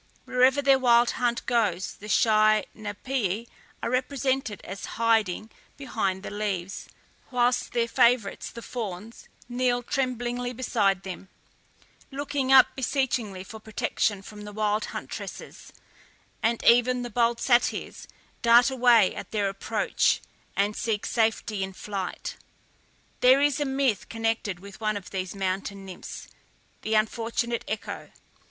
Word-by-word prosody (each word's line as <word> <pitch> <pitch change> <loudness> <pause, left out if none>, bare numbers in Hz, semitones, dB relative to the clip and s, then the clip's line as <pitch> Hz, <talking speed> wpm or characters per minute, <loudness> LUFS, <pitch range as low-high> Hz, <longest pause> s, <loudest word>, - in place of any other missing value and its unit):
Wherever 260 +3 +3
their 275 -1 +5
wild 240 -1 +5
hunt 240 -1 -1
goes 210 -7 0
the 210 - -10
shy 215 0 +4
Napææ 215 0 -3 0.4
are - - 0
represented 260 -3 -1
as 195 +2 -7
hiding 220 -2 +1 0.3
behind 200 -8 -2
the - - -6
leaves, 200 -3 -3 0.4
whilst 245 0 +1
their 235 -1 +1
favourites, 235 -3 +2
the 235 0 -10
fawns, 215 -2 -6 0.2
kneel 245 0 0
tremblingly 245 -1 -2
beside 205 -6 +1
them, 190 0 -8 0.8
looking 275 -1 -2
up 265 -1 +7
beseechingly 245 -7 -1
for 220 +3 -10
protection 215 -2 -1
from 210 +1 -10
the 210 0 -8
wild 210 0 0
huntresses; - - -8 0.7
and 230 +1 0
even 245 +1 +4
the 240 - -6
bold 235 +1 +2
Satyrs 245 -2 +1 0.3
dart 235 +2 +6
away 240 -6 +5
at - - -7
their 205 -2 0
approach, 195 0 +1 0.4
and 205 +1 +1
seek 220 -3 -1
safety 220 -2 0
in 190 0 -3
flight. 195 -1 -5 0.8
There 255 +2 +6
is 290 +1 +2
a 290 - 0
myth 265 -5 0
connected 225 -5 -2
with 200 +2 -12
one 215 -1 0
of 195 - -10
these 185 0 -4
mountain 195 +1 -3
nymphs, 185 -2 -9 0.5
the 220 0 -1
unfortunate 230 +2 0
Echo. 210 -1 -5
225 Hz, 130 wpm, -26 LUFS, 205-245 Hz, 0.8 s, up